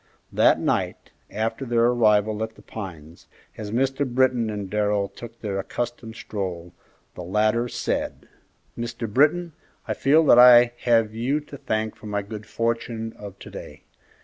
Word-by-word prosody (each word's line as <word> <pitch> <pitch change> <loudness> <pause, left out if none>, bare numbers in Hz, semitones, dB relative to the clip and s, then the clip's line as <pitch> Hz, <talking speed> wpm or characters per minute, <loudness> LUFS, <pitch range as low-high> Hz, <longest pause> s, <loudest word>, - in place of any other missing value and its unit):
That - - +4
night, - - -2 0.2
after 110 +5 -3
their 120 -2 +2
arrival 110 -3 +3
at 110 0 -4
The - - -17
Pines, 85 -6 -9 0.3
as 105 -1 -6
Mr. 135 +5 0
Britton 125 -3 +1
and 105 -2 -4
Darrell 105 0 0
took 115 -1 -11
their 100 -3 -3
accustomed 115 +2 -5
stroll, 90 -4 -5 0.4
the - - -8
latter 110 +6 +1
said, - - -3 0.5
"Mr. 120 0 -4
Britton, 155 +9 +2 0.3
I - - 0
feel 155 +4 +3
that 120 - +7
I 120 -1 +8
have 115 -3 +3
you 125 +6 0
to 145 -1 -11
thank 110 -4 -2
for 110 - -11
my 100 -1 -2
good 105 0 -9
fortune 115 0 -2
of 100 -2 -10
to - - -12
day. - - -10
115 Hz, 155 wpm, -24 LUFS, 105-120 Hz, 0.5 s, I